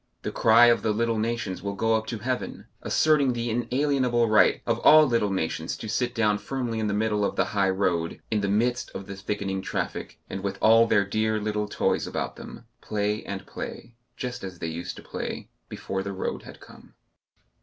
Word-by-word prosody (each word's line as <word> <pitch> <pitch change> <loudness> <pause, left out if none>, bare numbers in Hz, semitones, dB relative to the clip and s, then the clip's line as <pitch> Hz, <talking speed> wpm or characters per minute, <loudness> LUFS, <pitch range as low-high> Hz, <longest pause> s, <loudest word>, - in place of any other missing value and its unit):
The - - -3
cry 115 +2 +6
of 120 -1 +4
the 110 - +1
little 115 0 0
nations 115 -4 -2
will 100 +1 -4
go 115 +2 +1
up 110 0 0
to 115 - -3
heaven, 125 +4 -4 0.2
asserting 150 -4 +3
the 120 -1 -2
inalienable 125 0 +1
right 110 -1 +4
of - - 0
all 155 0 +7
little 115 -6 +1
nations 80 -3 -2
to - - -7
sit 120 +3 -1
down 105 -3 +2
firmly 120 +1 -3
in 110 - 0
the 100 - -1
middle 105 -1 +1
of - - -1
the - - +2
high 100 -2 +2
road, 90 -3 0
in 105 -1 +1
the 100 - 0
midst 120 +5 0
of 95 - -5
the 100 0 -7
thickening 95 -1 -3
traffic, - - -4
and 95 - -5
with 100 0 -3
all 115 +1 +6
their 100 -3 +3
dear 110 +2 0
little 105 0 -2
toys - - 0
about - - -3
them, - - -10 0.2
play 105 0 -1
and 95 -1 -5
play 115 - -8 0.2
just 125 -2 -5
as 95 -2 -7
they - - -5
used 85 +1 -5
to - - -11
play - - -6 0.2
before 95 0 -4
the 100 0 -5
road 95 - -3
had - - -12
come.... - - -16
110 Hz, 205 wpm, -26 LUFS, 100-120 Hz, 0.2 s, all